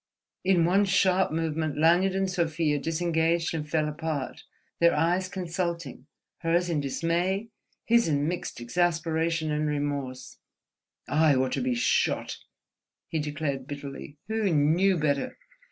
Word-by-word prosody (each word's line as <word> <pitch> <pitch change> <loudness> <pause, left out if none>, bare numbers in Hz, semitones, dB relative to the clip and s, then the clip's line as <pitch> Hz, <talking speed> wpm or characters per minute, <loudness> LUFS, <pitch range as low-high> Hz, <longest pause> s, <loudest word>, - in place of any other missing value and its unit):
In 185 -3 +3
one 195 +4 +3
sharp 190 -1 +3
movement 155 -2 -2
Lanyard 175 +5 +4
and 195 0 +1
Sofia 165 -4 0
disengaged 165 +2 0
and 150 -2 -4
fell 155 -1 +1
apart, 150 -2 -4 0.4
their 170 0 +5
eyes 180 +3 +1
consulting, 170 -6 -4 0.3
hers 170 +1 +1
in 155 - +1
dismay, 175 - -1 0.4
his 235 0 +4
in 145 -1 +1
mixed 175 -4 -4
exasperation 165 +3 0
and 150 0 0
remorse. 145 -3 -3 0.7
"I 155 -1 +4
ought 130 0 +1
to - - -1
be 250 0 0
shot," 245 +2 +1 0.7
he 160 - -1
declared, 145 -3 -3
bitterly—"who 145 +8 -4
knew 165 +6 +3
better! 145 -3 -1
165 Hz, 125 wpm, -27 LUFS, 150-180 Hz, 0.7 s, their